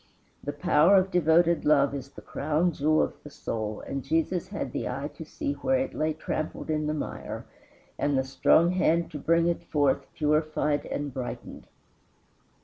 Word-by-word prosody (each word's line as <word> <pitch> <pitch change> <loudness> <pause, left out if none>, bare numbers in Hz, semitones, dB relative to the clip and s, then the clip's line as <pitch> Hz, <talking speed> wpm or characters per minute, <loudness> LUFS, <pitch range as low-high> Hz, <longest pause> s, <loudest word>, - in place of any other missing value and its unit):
The 145 - -2
power 170 +4 +4
of 190 0 +3
devoted 170 -1 +3
love 140 -2 +4
is 140 -1 -5
the - - -13
crown 155 +4 0
jewel 155 0 +2
of - - -5
the 150 - -10
soul, 110 -6 -4
and 135 -1 -5
Jesus 165 +4 0
had - - -4
the - - -3
eye - - -4
to - - -8
see 290 -2 -3
where 265 -1 +1
it 265 +1 -2
lay 155 +1 0
trampled 155 0 -4
in 155 -1 0
the 150 - 0
mire, 150 - -5 0.5
and 145 -2 +1
the 130 - +2
strong 155 +5 +4
hand 170 -2 +1
to 150 - -6
bring 165 +3 +3
it 170 0 0
forth 145 -3 0
purified 150 -1 +1
and 145 -2 -4
brightened. 125 -1 -6
155 Hz, 175 wpm, -27 LUFS, 145-170 Hz, 0.5 s, power